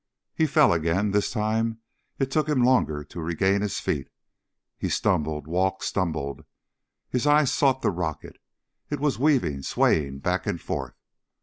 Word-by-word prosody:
He 160 - +2
fell 140 - +5
again. 85 +5 +1
This 105 0 +1
time 110 0 -1 0.4
it 135 -1 -1
took 155 +1 +1
him 135 -5 +2
longer 120 - +2
to 85 +4 -9
regain 95 +5 +1
his 105 -2 -2
feet. 70 - -2 0.7
He - - -2
stumbled... 75 -1 0
walked... 95 +4 0
stumbled. 80 -7 -2 0.7
His 125 +3 0
eyes 145 -2 +4
sought 135 -1 +2
the - - +2
rocket. 85 -4 -5 0.5
It 145 - -2
was 145 -5 0
weaving, 130 - +2
swaying 70 0 +1
back 90 +6 -2
and 85 - -1
forth. - - -5
95 Hz, 150 wpm, -25 LUFS, 80-130 Hz, 0.7 s, fell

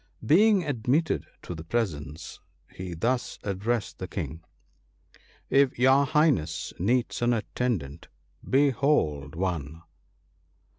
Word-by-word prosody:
Being 195 +4 +5
admitted 145 +3 0 0.2
to - - -6
the 80 -2 -8
presence, 80 -7 -3 0.3
he 90 -2 -6
thus 120 +9 -1
addressed 105 +3 -2
the - - -4
King: 80 +2 -5 0.4
— - - -32
* - - -32 0.3
If 135 -1 +4
your 135 +3 +4
Highness 130 - +1
needs 120 +8 0
an 120 0 +3
attendant, 105 - -3 0.4
behold 130 - +2
one 80 -3 -3
115 Hz, 110 wpm, -27 LUFS, 80-135 Hz, 0.4 s, Being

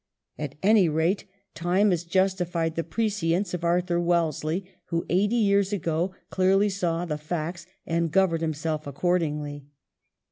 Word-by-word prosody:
At 145 -2 -4
any 200 -4 +5
rate 160 +6 +1 0.3
time 180 +5 +2
has 175 -2 0
justified 175 -2 0
the 165 - -2
prescience 195 -1 -1
of 175 -1 -3
Arthur 175 0 +1
Wellesley, 170 0 0 0.2
who 170 -1 -2
eighty 205 +6 +2
years 200 -3 +3
ago 175 -1 -1 0.2
clearly 195 +2 +3
saw 175 -3 -1
the 150 -3 -3
facts 165 +2 -4 0.2
and 165 0 0
governed 175 -2 +2
himself 155 -1 -2
accordingly. 150 -2 -1
170 Hz, 135 wpm, -26 LUFS, 160-190 Hz, 0.3 s, any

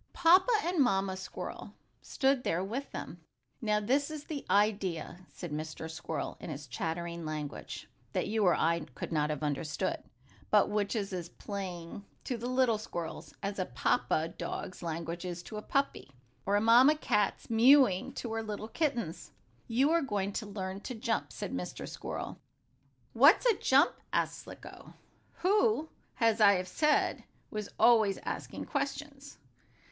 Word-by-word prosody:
Papa 360 +7 +5
and 350 0 0
Mamma 195 -6 +2
Squirrel 190 - -7 0.3
stood 270 -2 +1
there 170 +3 0
with 245 +8 -4
them. 175 - -7 0.4
"Now 210 -2 +2
this 270 +8 +1
is 305 -2 -6
the 295 -3 -5
idea," 190 -4 0
said 175 -4 -7
Mr. 155 +1 -5
Squirrel, 160 -1 -4
in - - -7
his 150 0 -6
chattering 170 +5 -4
language, 155 -2 -5 0.3
that - - 0
you 220 0 +1
or 180 -3 +5
I 170 +1 +2 0.2
could - - -5
not 150 -2 +1
have 150 0 -3
understood, 150 +5 -1 0.5
but 210 -1 +4
which 205 +1 0
was 200 -3 -2
as 175 -2 -4
plain 190 -2 -6 0.2
to 250 - -2
the 235 +1 -4
little 255 -4 +3
squirrels, 170 -6 -6
as 200 0 -3
a 185 - +1
papa 125 +6 +1
dog's 180 +1 -6
language 170 +1 -4
is 175 -1 -5
to 215 - -7
a - - -4
puppy, 275 - -1 0.4
or 200 - +3
a 205 - +3
mamma 245 +7 +7
cat's 210 -8 0
mewing 235 -4 +5
to 230 -2 -5
her 225 - -1
little 215 0 -5
kittens. 245 - -2 0.4
"You 260 +6 +3
are 335 - +5
all 285 - -2
going 200 -4 -1
to 215 - -3
learn 190 -1 -5
to 250 - -6
jump," 220 - -1
said - - -5
Mr. 90 0 -5
Squirrel. - - -6 0.7
"What's 285 - +6
a 480 - +6
jump?" 280 -1 +4 0.2
asked - - 0
Slicko, - - -12 0.4
who, 405 -3 +2 0.3
as 225 -2 +3
I 200 -1 +8
have 185 -1 -1
said, 300 +8 +2 0.3
was 210 -1 -4
always 220 -5 +5
asking - - -4
questions. 285 0 -4
205 Hz, 160 wpm, -31 LUFS, 175-260 Hz, 0.7 s, I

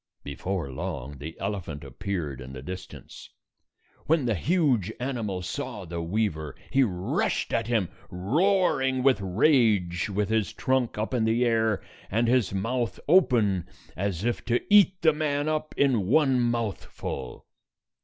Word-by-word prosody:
Before 75 +2 -4
long, 70 -3 -5
the 80 +3 -8
elephant 95 -7 -4
appeared 75 - -4
in 65 +1 -9
the 65 -1 -8
dis 90 +4 -6
tance. - - -12 0.8
When 155 -3 +3
the 115 - +2
huge 130 - +1
animal 115 -8 -3
saw 115 0 -5
the 85 0 -4
weaver, 85 -5 -2 0.2
he 135 - +4
rushed 95 -7 0
at - - 0
him, 115 -6 +1 0.2
roaring 135 - +1
with 130 -6 +4
rage, 100 - +2
with 100 +1 -1
his 110 -5 0
trunk 130 -4 0
up 110 +4 -2
in 120 -3 +1
the 115 +2 +2
air, 110 -3 +1 0.3
and 115 +4 +1
his 125 -3 +2
mouth 115 +5 -2
open 115 - +3 0.3
as 95 0 -2
if 120 - -1
to 120 0 +2
eat 195 -3 +6
the 160 -2 +6
man 145 -1 -1
up 155 0 -2
in 125 -9 +2
one 135 +1 +4
mouthful. 115 - -3
110 Hz, 145 wpm, -27 LUFS, 90-130 Hz, 0.8 s, eat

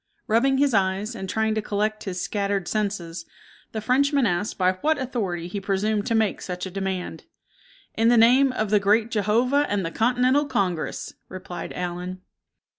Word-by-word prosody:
Rubbing 265 +5 +2
his 280 -2 +2
eyes, 195 +3 +1
and 190 -4 -6
trying 220 +1 +1
to 215 - -1
collect 215 +1 -2
his 185 -2 -4
scattered 200 -1 -1
senses, 190 -6 -2 0.5
the 220 - -4
Frenchman 275 +4 +2
asked 190 +1 -1
by 185 -1 +3
what 300 +13 0
authority 205 -10 -3
he 200 +3 -5
presumed 205 +2 0
to 230 - +1
make 220 -2 +1
such 180 0 -5
a 190 - -6
demand. 190 -1 -4 0.7
"In 225 +1 +2
the 240 0 +5
name 255 +4 +6
of 215 -4 -2
the 210 - +5
Great 215 +3 +2
Jehovah 240 +7 +2
and 200 -3 0
the 165 - -3
Continental 250 +6 +2
Congress!" 190 - -2 0.2
replied 185 -1 -7
Allen. 180 +1 -5
210 Hz, 170 wpm, -24 LUFS, 190-235 Hz, 0.7 s, name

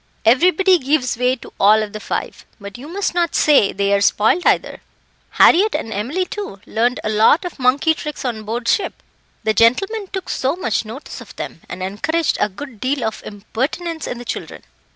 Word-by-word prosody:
"Everybody 360 - +4
gives 265 -2 0
way 250 +2 +1
to 250 - -14
all 215 +2 +5
of 210 0 -7
the 215 - -5
five 215 - -4 0.2
but 200 -1 -9
you 255 +4 -9
must 385 +4 -2
not 345 -2 0
say 285 -9 +4
they 200 0 0
are 200 - +2
spoiled, 220 - +2
either. - - +1 0.5
Harriett 415 +5 +5
and 225 - -3
Emily, 265 - -2
too, 400 - -7
learned 240 +3 0
a - - -1
lot 220 - +4
of 350 - -7
monkey 270 +5 +3
tricks 300 -3 -6
on 230 -3 -2
board 230 +3 -4
ship. 405 - +1 0.5
The 220 - +1
gentlemen 390 - +2
took 380 -1 -6
so 265 +4 -1
much 235 - -1
notice 230 +7 -9
of - - -13
them, 165 - -7
and 185 +1 -6
encouraged 310 - -1
a - - +1
good 230 +3 -10
deal 260 +2 -1
of 220 -1 -3
impertinence 275 - -4
in 245 - -4
the 245 - -9
children." - - -6
255 Hz, 195 wpm, -19 LUFS, 215-330 Hz, 0.5 s, all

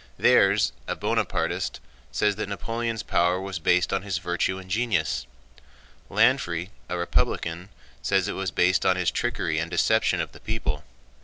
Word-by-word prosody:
Thiers, - - +5 0.2
a - - -1
Bonapartist, - - -1 0.3
says 105 -1 +1
that 110 - -3
Napoleon's 115 +2 -3
power 90 +1 +2
was 95 -2 -4
based 90 +3 +2
on 95 - +1
his 95 -2 -2
virtue 90 +1 -1
and 95 -1 -10
genius. 80 - 0 0.8
Lanfrey, 85 +3 +2 0.2
a 90 - -2
Republican, 85 +1 -1 0.3
says - - +1
it - - -2
was 95 -1 -2
based 90 +2 +2
on 95 - +4
his 90 -2 +1
trickery 80 0 -1
and 80 +1 -2
deception 110 +5 +2
of - - -2
the - - -14
people. 80 -10 -3
90 Hz, 155 wpm, -26 LUFS, 85-100 Hz, 0.8 s, Thiers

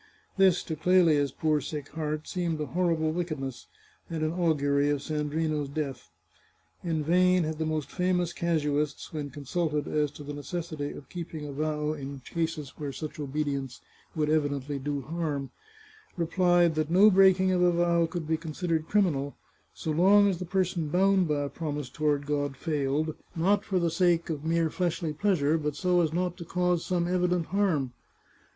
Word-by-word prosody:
This, 190 -3 +4
to 160 - -4
Clelia's 160 -4 +3
poor 155 +1 +1
sick 145 +1 -6
heart, 155 -1 -3
seemed 170 -4 -2
a 150 - -1
horrible 160 +1 0
wickedness, 155 -7 -4 0.4
and 160 -2 -2
an 155 - +1
augury 145 -5 +2
of 145 -1 -1
Sandrino's 150 -1 -1
death. 140 -4 -4 0.7
In 160 -3 -1
vain 180 +2 +4
had 155 0 -3
the 160 - 0
most 155 -2 -2
famous 180 -2 0
casuists, 150 -4 -1
when 150 -2 -4
consulted 150 +2 -2
as 150 -1 +1
to 145 - -10
the 145 +1 -6
necessity 150 0 -4
of 140 - -10
keeping 165 -3 -6
a 145 - -6
vow 150 +1 -1
in 140 -2 -7
cases 160 -2 -3
where 145 -2 -3
such 155 +3 -7
obedience 140 -3 -3 0.4
would 155 -2 +1
evi 155 -1 +2
dently 140 0 -4
do 145 -1 -2
harm, 150 -2 -3 0.7
replied 175 0 +3
that 155 0 -1
no 195 +5 +6
breaking 190 -1 +5
of 180 -1 +2
a 180 0 +5
vow 170 -1 +2
could 170 -1 -4
be 160 0 +1
considered 160 0 -2
criminal, 150 -9 +1 0.4
so 160 - -3
long 195 +6 +5
as 185 -4 0
the 180 - -4
person 180 -2 0
bound 190 +2 +3
by 145 -2 0
a - - -2
promise 145 -3 -4
toward 145 -1 0
God 145 -2 -1
failed, 150 0 -1 0.2
not 195 +5 +2
for 190 - -1
the 170 -2 +1
sake 170 -1 +2
of 150 -2 -4
mere 165 0 +1
fleshly 170 -3 -1
pleasure, 160 -3 +2
but 150 -1 -2
so 180 +2 +2
as 160 -3 +1
not 180 +1 -1
to 175 - -7
cause 180 0 0
some 175 -2 0
evident 180 -1 +1
harm. 170 -10 +1
160 Hz, 175 wpm, -28 LUFS, 145-175 Hz, 0.7 s, no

